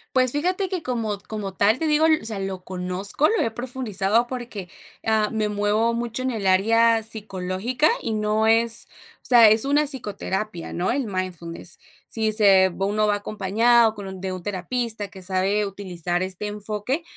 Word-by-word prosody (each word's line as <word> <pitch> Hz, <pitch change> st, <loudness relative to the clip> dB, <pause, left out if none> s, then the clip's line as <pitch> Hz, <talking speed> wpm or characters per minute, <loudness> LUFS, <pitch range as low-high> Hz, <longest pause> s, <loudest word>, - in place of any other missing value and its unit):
Pues 255 Hz, -1 st, +3 dB
fíjate 365 Hz, +7 st, -1 dB
que, 365 Hz, -3 st, -3 dB
como 225 Hz, -5 st, -2 dB
como 205 Hz, -3 st, -5 dB
tal, 215 Hz, +5 st, +3 dB
te 320 Hz, -, 0 dB
digo, 305 Hz, +1 st, +3 dB
o 315 Hz, -4 st, +3 dB
sea, 220 Hz, -2 st, -2 dB
lo 195 Hz, -1 st, -5 dB
conozco, 185 Hz, +9 st, -1 dB
lo 450 Hz, -, +1 dB
he 230 Hz, -, 0 dB
profundizado, 235 Hz, -2 st, 0 dB
porque, 235 Hz, -7 st, -6 dB, 0.3 s
ah, 220 Hz, -1 st, +1 dB
me 215 Hz, -1 st, 0 dB
muevo 210 Hz, +3 st, +1 dB
mucho 235 Hz, +1 st, -3 dB
en 260 Hz, -, -1 dB
el 220 Hz, -5 st, -4 dB
área 225 Hz, +4 st, +4 dB
psicológica, 215 Hz, +4 st, -1 dB
y 225 Hz, -, -3 dB
no 215 Hz, +1 st, +1 dB
es 225 Hz, +1 st, +3 dB, 0.4 s
o -, -, -39 dB
sea, 235 Hz, -4 st, +7 dB
es 220 Hz, +3 st, +4 dB
una 290 Hz, +2 st, +2 dB
psicoterapia, 210 Hz, -, -4 dB
¿no?, 180 Hz, +5 st, -1 dB
el 265 Hz, -2 st, -1 dB
mindfulness. 175 Hz, -3 st, -5 dB, 0.3 s
Si 220 Hz, -1 st, 0 dB
se 195 Hz, -3 st, +6 dB
uno 205 Hz, +2 st, +1 dB
va 205 Hz, -, +2 dB
acompañado 220 Hz, +3 st, +2 dB
con 205 Hz, -2 st, -8 dB
un 190 Hz, -1 st, -8 dB
de 190 Hz, 0 st, -3 dB
un 185 Hz, -1 st, -7 dB
terapista, 210 Hz, +3 st, -3 dB
que 190 Hz, -1 st, -12 dB
sabe 195 Hz, +3 st, 0 dB
utilizar 180 Hz, -3 st, -3 dB
este 185 Hz, +2 st, -3 dB
enfoque. 210 Hz, +8 st, -3 dB
215 Hz, 175 wpm, -23 LUFS, 195-235 Hz, 0.4 s, sea